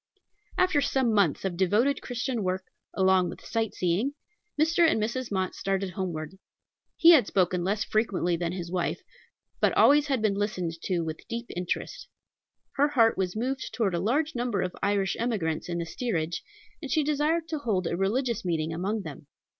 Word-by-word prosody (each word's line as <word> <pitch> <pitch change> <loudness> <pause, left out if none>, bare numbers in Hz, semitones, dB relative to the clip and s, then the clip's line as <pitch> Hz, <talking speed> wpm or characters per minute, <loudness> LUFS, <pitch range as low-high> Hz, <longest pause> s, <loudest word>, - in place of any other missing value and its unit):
After 370 -6 +3
some 260 -5 +1
months 195 -5 +2
of 185 -2 -1
devoted 210 +10 +2
Christian 245 -1 -3
work, 185 0 -1 0.3
along 190 -1 +3
with - - -10
sight 225 -2 -2
seeing, 190 +11 0 0.4
Mr. 320 +3 +2
and 325 -8 +5
Mrs. 235 +3 -2
Mott 190 -2 -1
started 195 -1 -2
homeward. 175 -1 -5 0.6
He 335 0 +8
had 265 -11 +6
spoken 180 -2 +1
less 205 +3 0
frequently 200 -5 0
than 170 0 -2
his 175 -2 -5
wife, 180 -2 -2 0.6
but - - +2
always 295 +1 +6
had 270 -3 +1
been 215 -2 +1
listened 195 -4 -2
to 180 -3 0
with 160 -1 -6
deep 235 +1 -5
interest. 180 0 -4 0.7
Her 285 +1 +4
heart 235 -6 +3
was 185 0 -2
moved 255 +4 -3
toward 210 -6 +1
a 170 - 0
large 285 - 0
number 240 -5 -1
of 180 - -4
Irish 200 -1 +1
emigrants 190 -10 -1
in 170 - -2
the 170 - -2
steerage, 170 -4 -2 0.4
and 285 - -6
she 310 +1 +2
desired 305 +3 +1
to 310 - -2
hold 205 -9 -1
a 170 - -1
religious 230 +5 0
meeting 165 -3 -1
among 195 +5 -2
them. 150 -2 -9
200 Hz, 180 wpm, -27 LUFS, 180-250 Hz, 0.7 s, He